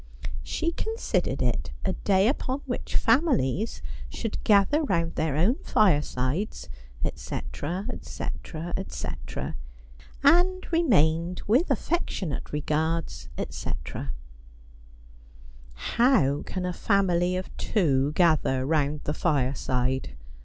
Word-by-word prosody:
She 335 0 -1
considered 445 +6 -1
it - - 0 0.2
a 190 - +1
day 195 +1 +3
upon 265 +1 -1
which 245 -3 -4
families 225 - +2 0.3
should 225 -3 -4
gather 210 +9 +4
round 170 - 0
their 155 -3 0
own 210 - +3
firesides, 150 -2 +1 0.4
etc., 180 +7 -4
etc., 170 -8 -5
etc., 190 - -5 0.7
and 355 +6 +4
remained, 180 - +3
with 255 - +3
affectionate 190 - -1
regards, 155 +2 -1
etc. 70 - -4 0.9
' - - -22 0.3
How 190 - +4
can 185 -1 -3
a 180 - -1
family 180 -3 +2
of 185 - -6
two 145 -8 +1
gather 155 -6 +3
round 150 0 +1
the 150 - -1
fireside 130 -4 0
175 Hz, 100 wpm, -27 LUFS, 145-225 Hz, 0.9 s, gather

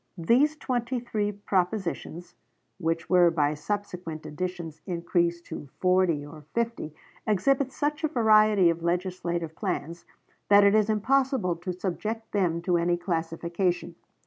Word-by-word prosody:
These 255 - +3
twenty 250 -2 -2
three 215 -3 -2
propositions, 185 -3 -2 0.5
which 165 +1 -1
were 180 -2 +5
by 150 -3 +1
subsequent 175 -2 -5
additions 165 0 -5
increased 170 -1 0
to 145 - -8
forty 180 -5 +2
or 155 +1 -11
fifty, 230 -10 -2 0.3
exhibit 265 +6 +2
such 300 +3 -2
a - - +3
variety 215 - +5
of 165 0 -5
legislative 170 -2 -2
plans 175 -4 -4 0.4
that 200 0 +7
it 200 0 +5
is 215 0 +3
impossible 255 - +1
to 175 +2 -4
subject 210 +5 -4
them 170 -4 0
to 175 -1 +2
any 175 +1 +1
classification. 170 +1 -2
180 Hz, 130 wpm, -27 LUFS, 170-215 Hz, 0.5 s, that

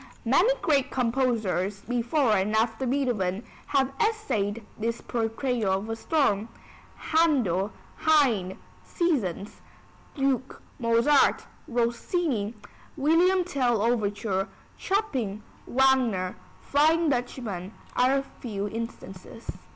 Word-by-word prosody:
Many 345 - +4
great 285 -6 +2
composers 230 -6 0
before 245 +3 +1
and 200 +2 +1
after 225 +3 +1
Beethoven 240 -7 0 0.2
have 275 -1 +1
essayed 230 - -1
this 230 +1 -2
portrayal 225 -2 -1
of 195 +3 -2
a - - -1
storm, 225 -5 +1 0.6
Händel, 255 - +3 0.3
Haydn 240 -12 +2 0.3
(Seasons), 215 - -2 0.6
Glück, 270 -1 0 0.2
Mozart, 235 +4 +3 0.2
Rossini 240 - -1 0.4
(William 345 +6 +3
Tell 255 - +1
overture), 205 -4 0 0.3
Chopin, 260 - -2 0.2
Wagner 245 -8 +2 0.3
(Flying 315 +3 +3
Dutchman), 240 -8 -3 0.2
are 255 +2 +4
a 275 - -1
few 210 -7 -5
instances. 225 -1 -8
240 Hz, 95 wpm, -27 LUFS, 210-275 Hz, 0.6 s, Many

